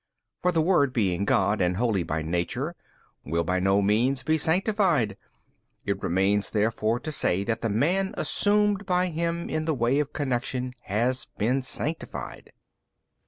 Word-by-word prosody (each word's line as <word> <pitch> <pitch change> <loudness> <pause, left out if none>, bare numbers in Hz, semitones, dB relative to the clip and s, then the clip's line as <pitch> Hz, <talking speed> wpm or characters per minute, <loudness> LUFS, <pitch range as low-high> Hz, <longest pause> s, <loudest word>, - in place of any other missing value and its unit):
For 180 - +2
the 165 -2 +2
Word 150 -7 +3
being 100 -5 0
God 105 -3 +2
and 90 0 +1
Holy 110 -4 +1
by 80 -1 -2
Nature 90 - -2 0.5
will 85 +4 -1
by 90 +2 0
no 95 +2 +2
means 125 +6 +1
be 155 +4 +2
sanctified; 170 - +1 0.7
it - - -2
remains 95 +3 +1
therefore 110 +1 0
to 155 - -4
say 95 -9 0
that 115 +2 -2
the 115 - -1
man 175 - +1
assumed 205 -1 +2
by 180 0 +1
Him 170 +1 -2
in 155 0 -2
the 160 -2 0
way 125 +3 +1
of 150 -1 -1
connection 125 -2 -2
has 120 +6 0
been 125 +6 +1
sanctified. 150 +4 -5
125 Hz, 155 wpm, -26 LUFS, 100-160 Hz, 0.7 s, Word